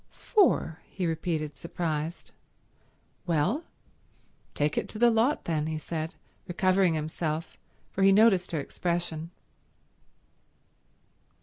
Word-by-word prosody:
"Four?" 360 Hz, -, +2 dB
he 185 Hz, -, -3 dB
repeated 160 Hz, -2 st, -2 dB
surprised. 160 Hz, 0 st, -4 dB, 1.0 s
"Well, 175 Hz, -, +1 dB, 0.9 s
take 150 Hz, +1 st, +1 dB
it -, -, -1 dB
to -, -, -8 dB
the 240 Hz, +1 st, +5 dB
lot 230 Hz, +6 st, +2 dB
then," 155 Hz, -2 st, 0 dB
he 160 Hz, 0 st, -2 dB
said, 160 Hz, +1 st, -4 dB, 0.3 s
recovering 185 Hz, -2 st, +3 dB
himself, 155 Hz, +1 st, -3 dB, 0.4 s
for 195 Hz, -, -3 dB
he 195 Hz, 0 st, +7 dB
noticed 195 Hz, -3 st, +5 dB
her 160 Hz, -, -1 dB
expression. 170 Hz, +1 st, -2 dB
170 Hz, 105 wpm, -28 LUFS, 155-195 Hz, 1.0 s, he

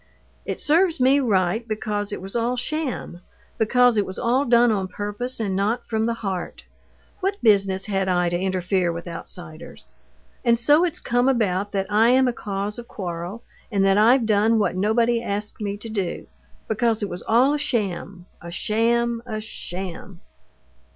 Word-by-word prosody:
"It -, -, -4 dB
serves 330 Hz, +2 st, +2 dB
me 265 Hz, +3 st, +4 dB
right, 220 Hz, -2 st, +1 dB
because 210 Hz, -2 st, -3 dB
it 205 Hz, -, -5 dB
was 195 Hz, +3 st, -8 dB
all 240 Hz, +2 st, 0 dB
sham; 255 Hz, -, -3 dB, 0.4 s
because 245 Hz, +1 st, +4 dB
it 205 Hz, -, +2 dB
was 185 Hz, -, -7 dB
all 255 Hz, +4 st, +1 dB
done 240 Hz, -1 st, +5 dB
on 195 Hz, -3 st, -1 dB
purpose, 205 Hz, +7 st, -4 dB
and 200 Hz, -4 st, -1 dB
not 215 Hz, +5 st, 0 dB
from 220 Hz, -1 st, -1 dB
the 230 Hz, 0 st, 0 dB
heart. 185 Hz, -2 st, -4 dB, 0.6 s
What 395 Hz, +1 st, -1 dB
business 195 Hz, -3 st, +3 dB
had 195 Hz, -2 st, -1 dB
I 180 Hz, -1 st, +2 dB
to 175 Hz, -, -1 dB
interfere 185 Hz, -1 st, 0 dB
with 170 Hz, +1 st, -7 dB
outsiders? 170 Hz, -1 st, -9 dB, 0.6 s
And 235 Hz, -2 st, +4 dB
so 290 Hz, +8 st, +4 dB
it's 350 Hz, -3 st, -1 dB
come 245 Hz, +2 st, +1 dB
about 205 Hz, -5 st, 0 dB
that 195 Hz, -1 st, 0 dB
I'm 235 Hz, +5 st, +4 dB
a 245 Hz, -, 0 dB
cause 205 Hz, +1 st, -4 dB
of 235 Hz, -, -9 dB
quarrel, 180 Hz, +3 st, -6 dB, 0.3 s
and 195 Hz, -2 st, +2 dB
that 195 Hz, +1 st, +4 dB
I've 235 Hz, +3 st, +5 dB
done 220 Hz, +1 st, +3 dB
what 205 Hz, -3 st, +1 dB
nobody 230 Hz, +4 st, +2 dB
asked 210 Hz, -1 st, -4 dB
me 205 Hz, -1 st, -3 dB
to 225 Hz, +2 st, -8 dB
do. 195 Hz, -5 st, -3 dB, 0.4 s
Because 225 Hz, 0 st, 0 dB
it -, -, 0 dB
was 175 Hz, -, -6 dB
all 250 Hz, +6 st, +3 dB
a 295 Hz, -, -1 dB
sham! 200 Hz, -8 st, -2 dB, 0.2 s
a 170 Hz, -, -8 dB
sham! 230 Hz, +5 st, 0 dB
a 215 Hz, -2 st, -3 dB
sham!..." 190 Hz, -3 st, -7 dB
215 Hz, 170 wpm, -23 LUFS, 195-235 Hz, 0.6 s, done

